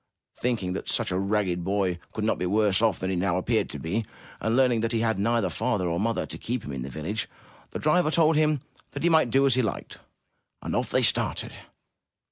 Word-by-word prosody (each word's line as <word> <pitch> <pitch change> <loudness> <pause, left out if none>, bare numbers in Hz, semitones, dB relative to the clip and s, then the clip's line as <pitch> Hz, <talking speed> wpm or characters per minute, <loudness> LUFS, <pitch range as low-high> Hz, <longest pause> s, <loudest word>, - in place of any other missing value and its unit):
Thinking 110 -7 -1
that 95 - -5
such - - 0
a 90 - 0
ragged 100 -3 0
boy 95 -2 0
could 110 - -4
not 110 - +1
be 90 - -1
worse 105 +1 +3
off 110 -6 +2
than 95 +1 -2
he - - 0
now 90 0 +1
appeared 110 +4 0
to - - -6
be, 85 +11 -2 0.4
and 110 +1 0
learning 125 -3 +3
that 115 +1 -1
he 115 - +1
had 110 -3 0
neither 115 -3 +1
father 110 -3 -1
nor 85 0 -1
mother 115 +2 0
to - - -8
keep 125 +1 -3
him - - -6
in 65 -2 -5
the 65 - -5
village, 85 - -4 0.4
the - - -5
driver 155 +1 +2
told 160 0 +3
him 150 -2 +2 0.3
that - - -5
he 170 - +4
might 160 -6 +4
do 135 +4 +3
as 135 - +4
he 130 - +3
liked. 110 -5 -4 0.6
And - - -3
off - - 0
they - - +2
started. - - +1
110 Hz, 230 wpm, -26 LUFS, 95-125 Hz, 0.6 s, he